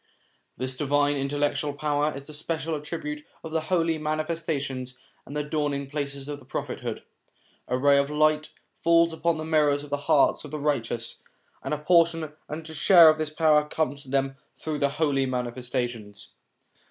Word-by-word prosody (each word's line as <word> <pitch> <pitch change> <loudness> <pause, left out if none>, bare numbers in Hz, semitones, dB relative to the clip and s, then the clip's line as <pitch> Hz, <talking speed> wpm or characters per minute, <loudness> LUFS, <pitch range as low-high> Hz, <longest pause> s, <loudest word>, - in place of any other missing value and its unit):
This 130 0 -2
divine 145 +1 +2
intellectual 145 +1 -1
power 150 +1 0
is 140 - -7
the 155 - -10
special 160 +1 -2
attribute 150 0 -5 0.2
of 160 - -7
the 160 0 0
Holy 165 -1 +1
Manifestations 155 -5 -3 0.3
and 145 - -5
the 150 - 0
Dawning 145 -2 -2
places 140 -2 -4
of 145 -3 -7
prophethood; - - -4 0.6
a 125 - 0
ray 140 +1 +5
of 140 - +1
this 150 - -6
light 155 0 +3 0.3
falls 170 0 +4
upon 165 0 0
the 155 - -4
mirrors 150 -3 +2
of 145 - -11
the 145 - +1
hearts 150 -3 +4
of - - -8
the 155 - -4
righteous, 120 -5 -2 0.4
and - - -5
a 150 - +1
portion 165 -1 +3 0.2
and 155 +1 -6
a 160 - -6
share 165 +3 +8
of 155 0 +2
this 155 -1 0
power 155 -1 +4
comes 150 -2 -2
to 135 - -14
them 135 0 0 0.2
through 155 -2 -4
the 140 - +2
Holy 140 -2 +1
Manifestations. 120 -4 -4
150 Hz, 175 wpm, -26 LUFS, 140-155 Hz, 0.6 s, share